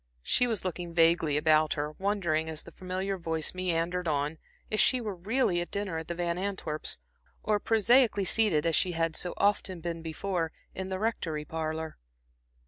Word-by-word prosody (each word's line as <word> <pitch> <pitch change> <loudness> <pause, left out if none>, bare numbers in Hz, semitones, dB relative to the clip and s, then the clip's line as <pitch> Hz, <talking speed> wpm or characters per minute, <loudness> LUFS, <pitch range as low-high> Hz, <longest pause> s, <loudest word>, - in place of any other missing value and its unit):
She 245 - +2
was 220 -5 -2
looking 175 -1 -4
vaguely 165 -3 +4
about 155 0 +4
her, 150 0 -2
wondering 170 -4 0
as 155 -1 -4
the - - -12
familiar 185 +1 -3
voice 160 -2 -1
meandered 180 -1 -1
on, 150 +1 0 0.3
if 215 - +1
she 255 - +4
were 215 -4 -3
really 190 0 +1
at 175 - -5
dinner 200 -5 -2
at 160 - -8
the 170 - -3
Van 170 0 -1
Antwerps', 185 - -3 0.5
or 210 -1 +2
prosaically 225 -1 +4
seated 190 -8 +3
as 165 -2 +2
she 180 -2 +2
had 165 -1 0
so 180 - -2
often 200 -3 +1
been 165 0 -4
before, 165 +1 -2 0.2
in 190 0 -5
the 190 - -2
Rectory 170 -8 -2
parlor. 160 0 -4
175 Hz, 175 wpm, -29 LUFS, 160-195 Hz, 0.5 s, vaguely